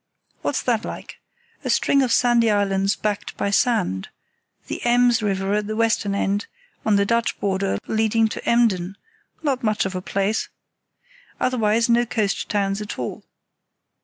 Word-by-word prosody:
What's 285 - -1
that 235 -3 +1
like? - - -8 0.4
A - - -3
string 280 - +3
of 255 -3 +1
sandy 240 -2 +4
islands 200 -1 +1
backed 210 -1 -3
by 200 - -1
sand; 200 - +1 0.6
the - - -5
Ems 240 -1 +3
river 195 -1 -1
at 210 0 0
the 215 - -3
western 225 -3 +1
end, 200 +1 -1 0.4
on 215 - +3
the 200 0 +3
Dutch 230 +2 0
border, 195 0 0
leading 220 0 +2
to - - -6
Emden—not 235 - -1
much 215 -2 +1
of 190 - -3
a 185 - -3
place. 200 +3 -1 0.9
Otherwise, 230 -1 +2
no 235 0 +3
coast 210 -3 -1
towns 200 -1 0
at 210 - -6
all. - - -5
215 Hz, 150 wpm, -22 LUFS, 200-235 Hz, 0.9 s, sandy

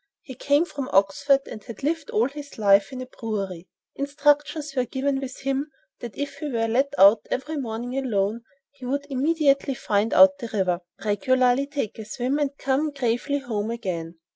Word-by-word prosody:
He 260 - -9
came 285 +5 +2
from 280 -6 -6
Oxford 200 +9 +3
and 215 - -9
had 230 +2 -10
lived 315 +1 -1
all 230 +3 +2
his 285 0 -10
life 200 -2 +4
in 255 -1 -5
a - - -8
brewery. 195 -8 -5 0.2
Instructions 290 +1 0
were 255 - +2
given 270 +3 -1
with 270 -1 -7
him 275 +2 -1 0.3
that 240 -3 -8
if 285 0 -4
he 300 - -4
were 230 -3 0
let 265 +5 +1
out 200 +3 +6
every 295 +5 -3
morning 245 -1 -4
alone 225 -4 0 0.3
he 280 -2 -17
would 280 +3 -2
immediately 280 -1 +2
find 210 -1 0
out 285 0 +6
the 235 - -5
river, 185 -5 0 0.3
regularly 255 +4 +2
take 280 -7 -4
a 220 - -6
swim 255 +6 -2
and 280 -1 -1
come 275 +3 0
gravely 275 0 -1
home 225 -6 -3
again. 180 -8 -4
260 Hz, 180 wpm, -24 LUFS, 220-280 Hz, 0.3 s, out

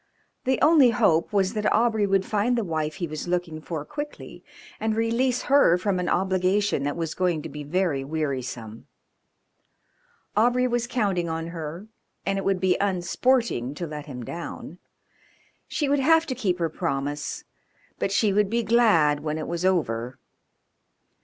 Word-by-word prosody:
The 260 0 +1
only 300 -5 +6
hope 170 -7 +2
was 195 -1 +1
that 210 -1 0
Aubrey 220 -3 +2
would 195 -1 +2
find 220 +4 +1
the 230 - 0
wife 155 -4 -2
he 180 - -3
was 155 +1 -6
looking 175 -3 -2
for 155 -2 -5
quickly 295 - -7 0.4
and 220 0 0
release 235 +3 +1
her 275 -11 +5
from 185 0 -1
an 180 - -1
obligation 190 0 +1
that 145 +1 -2
was 165 -2 -3
going 175 -4 0
to - - -6
be 150 0 -7
very 155 -3 0
wearisome. 130 -7 -4 1.5
Aubrey 245 +4 +3
was 240 -1 0
counting 200 -8 0
on 165 +1 -3
her, 165 +2 -6 0.4
and 195 0 0
it - - -5
would 195 -1 +1
be 185 -1 +2
unsporting 190 - 0
to 175 - -4
let 150 -2 -7
him 125 -4 -7
down; 170 +2 -7 0.9
she 295 - -1
would 285 +1 +2
have 325 +4 +4
to 270 - -3
keep 195 -8 -1
her 170 -2 0
promise, 145 -3 -3 0.6
but 195 - -1
she 205 0 +2
would 205 0 +2
be 235 +2 0
glad 205 -10 +4
when 150 +1 -3
it 155 - -4
was 170 +1 -3
over. 130 -10 0
185 Hz, 165 wpm, -25 LUFS, 155-220 Hz, 1.5 s, only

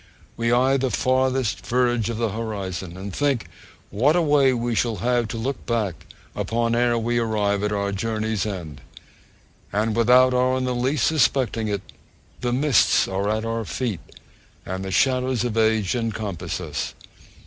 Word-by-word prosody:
We 115 0 0
eye 130 +3 +3
the 130 0 0
farthest 130 -2 0
verge 120 -2 +1
of 115 - -3
the 115 -1 0
horizon, 95 -5 -5
and 95 0 -6
think 140 -5 0 0.4
what 130 - +3
a 175 - +3
way 145 -3 +4
we 120 -1 -1
shall 115 0 0
have 120 +3 0
to 115 - -5
look 130 +4 -3
back 105 -9 -2 0.3
upon, 115 0 0
ere 120 0 +2
we 120 +1 0
arrive 105 -3 0
at 105 0 -1
our 100 -1 -1
journey's 110 0 -2
end; 85 -10 -6 0.9
and 105 +2 0
without 125 +2 +5
our 130 +1 +2
in 130 - -1
the 125 0 -1
least 125 +2 0
suspecting 130 -7 +1
it, 100 -2 -2 0.6
the 120 -1 -1
mists 135 -1 +3
are 95 +2 -1
at 110 +1 -1
our 115 0 -2
feet, 110 -4 -3 0.6
and 95 +1 -4
the 95 - -4
shadows 130 +2 +1
of 120 -3 -2
age 110 -3 +2
encompass 110 -7 -3
us. - - -4
115 Hz, 165 wpm, -23 LUFS, 105-125 Hz, 0.9 s, without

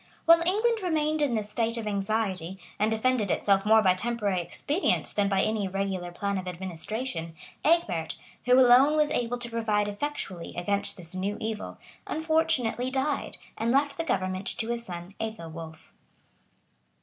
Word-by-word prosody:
[*] - - -32
While 335 0 +7
England 440 +4 +2
remained 310 -3 0
in 275 -5 +2
this 210 -1 -3
state 230 +1 0
of 225 - -4
anxiety, 195 -3 -1 0.2
and 210 +1 +3
defended 225 -1 +1
itself 195 +2 +2
more 220 0 +6
by 185 -2 +5
temporary 205 -2 -1
expedients 285 - 0
than 200 -1 +1
by 195 -1 +2
any 215 -2 0
regular 190 -2 -2
plan 200 +2 -2
of 185 - -7
administration, 180 0 -4 0.3
Egbert, 205 - +1 0.3
who 250 +1 +6
alone 260 +4 +6
was 300 -1 +3
able 245 -2 -1
to 240 -1 -5
provide 215 -3 +1
effectually 205 -6 -4
against 200 +3 -1
this 170 -2 -11
new 195 +3 -2
evil, 220 -1 -4 0.3
unfortunately 315 -6 +1
died, 270 +2 -1 0.2
and 225 - 0
left 280 +3 +2
the 330 - -2
government 185 - -1
to 225 - -2
his 235 0 -2
son 175 -2 -7
Ethelwolf. 165 -7 -7
220 Hz, 160 wpm, -28 LUFS, 190-255 Hz, 0.3 s, While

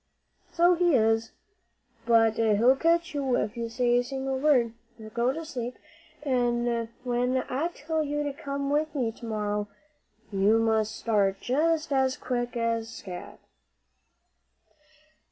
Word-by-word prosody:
"So 345 +1 +4
he 350 -3 +3
is; 225 -1 +2 0.8
but 225 -1 +5
he'll 225 +3 +4
catch 335 +3 +1
you 270 -4 0
if 210 0 -1
you 235 -1 -3
say 240 +1 +2
a - - 0
single 265 +1 -3
word. 260 -6 +3 0.2
Now 220 -1 -10
go 235 +3 +1
to 325 +4 -6
sleep, 250 -5 -5 0.5
an' 240 -3 0
when 250 +1 0
I 280 +6 -1
tell 320 -1 -3
you 295 0 -1
to 290 -1 -3
come 280 0 -4
with 305 +1 0
me 245 -5 0
to 230 - -12
morrow, 210 -1 -2 0.6
you 200 +3 +3
must 220 -2 +1
start 200 -4 +1
just 310 +3 0
as 265 0 +2
quick 245 -2 -3
as 230 -1 -1
scat." 180 -5 -9
245 Hz, 140 wpm, -27 LUFS, 225-280 Hz, 0.8 s, but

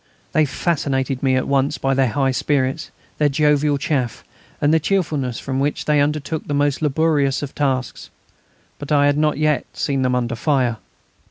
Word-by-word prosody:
They 155 - +3
fascinated 140 -3 -1
me 130 -1 +2
at 130 - 0
once 140 0 +1
by 135 0 0
their 135 -1 +2
high 135 +3 0
spirits, 135 +2 -1 0.3
their 150 -1 +3
jovial 150 0 +2
chaff, 135 -5 -2 0.4
and 145 +2 +2
the 160 - +4
cheerfulness 150 - -1
with 130 -1 -2
which 140 +2 -1
they 150 -1 +3
undertook 150 +2 -2
the 145 - -1
most 145 0 +1
laborious 150 -2 +1
tasks. 130 -3 -2 0.7
But 145 +1 -7
I 145 -1 +4
had 145 0 +2
not 155 0 +1
yet 150 -3 +1
seen 140 -3 -1
them 125 -1 +1
under 120 -1 -1
fire. 125 -2 0
140 Hz, 170 wpm, -20 LUFS, 130-150 Hz, 0.7 s, the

